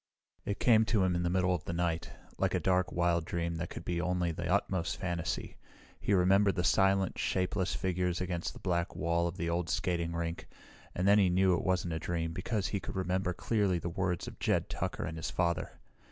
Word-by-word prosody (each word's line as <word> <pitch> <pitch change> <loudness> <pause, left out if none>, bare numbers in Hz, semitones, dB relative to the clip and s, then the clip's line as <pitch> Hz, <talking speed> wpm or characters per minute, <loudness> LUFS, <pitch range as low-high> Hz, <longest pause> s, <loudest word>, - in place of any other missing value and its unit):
It 100 - -2
came 110 -3 +5
to 105 -2 +2
him 90 -1 +2
in 85 - 0
the 85 - 0
middle 90 0 +2
of 90 - -3
the 85 - -3
night, 85 -1 -1 0.3
like - - +1
a - - +2
dark, 90 -1 +1
wild 85 -1 +1
dream 85 0 -2
that 85 +2 -4
could - - -8
be 85 -1 -1
only 90 -1 0
the 85 +1 -3
utmost 95 -3 0
fantasy. 85 -3 -3 0.4
He 100 - +1
remembered 95 +2 +4
the 90 - 0
silent, 95 +1 +2
shapeless 95 0 0
figures 90 -1 -1
against 90 -2 -3
the - - -11
black 85 -2 -1
wall 85 +1 +1
of 85 +2 -5
the 85 - -2
old 85 0 -1
skating 85 +3 -1
rink, 85 0 -3 0.5
and 90 +2 0
then 100 +1 +6
he 95 -3 +4
knew 95 +1 +4
it - - 0
wasn't 90 -3 0
a 80 - -2
dream 80 0 -2
because 100 +3 -2
he 100 - -1
could - - -7
remember 95 0 0
clearly 100 0 +1
the 85 - -3
words 90 0 -2
of - - -9
Jed - - 0
Tucker - - -3
and 80 -1 -5
his 80 - -3
father. 85 -1 -1
90 Hz, 215 wpm, -32 LUFS, 85-95 Hz, 0.5 s, then